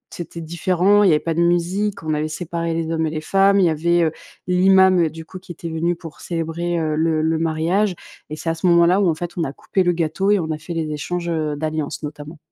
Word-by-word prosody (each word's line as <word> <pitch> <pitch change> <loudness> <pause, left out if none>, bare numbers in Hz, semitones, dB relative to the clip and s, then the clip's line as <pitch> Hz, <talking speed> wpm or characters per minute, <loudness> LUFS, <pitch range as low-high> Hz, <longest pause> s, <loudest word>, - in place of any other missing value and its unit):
c'était 170 -1 -7
différent, 180 +4 +2
il 195 - +5
y - - +5
avait 150 - +3
pas 165 - -2
de 170 - 0
musique, 175 +4 0
on 155 -1 -1
avait 150 +1 -1
séparé 165 +1 -3
les 165 0 -2
hommes 160 -1 0
et - - -1
les 155 0 -4
femmes, 195 +3 +3
il 185 - +4
y 170 - +4
avait, 170 +2 +2
heu, 160 - +1 0.4
l'imam, 190 0 +5
heu, - - -1
du 160 +1 -10
coup 185 - -10
qui 185 - -12
était 170 0 -7
venu 170 +2 -1
pour 165 -3 -11
célébrer, 170 +1 -3
heu, 155 -1 -1
le 160 0 +1
le 160 0 +1
mariage 170 +5 0 0.3
et 155 - -5
c'est 165 - -4
à - - +1
ce 170 +3 -1
moment-là 170 +3 +4
où 185 - +3
en 160 - +1
fait, 175 +2 -5
on 165 - 0
a 135 - -4
coupé 190 - -2
le 175 - +2
gâteau 170 +4 -1
et 205 - +4
on 160 -2 -3
a 155 - -3
fait 170 +2 -7
les 160 -2 -2
échanges, 170 +3 -3
heu, 155 -3 -1
d'alliance, 155 -1 -3
notamment. 150 +2 -8
165 Hz, 265 wpm, -20 LUFS, 160-180 Hz, 0.4 s, il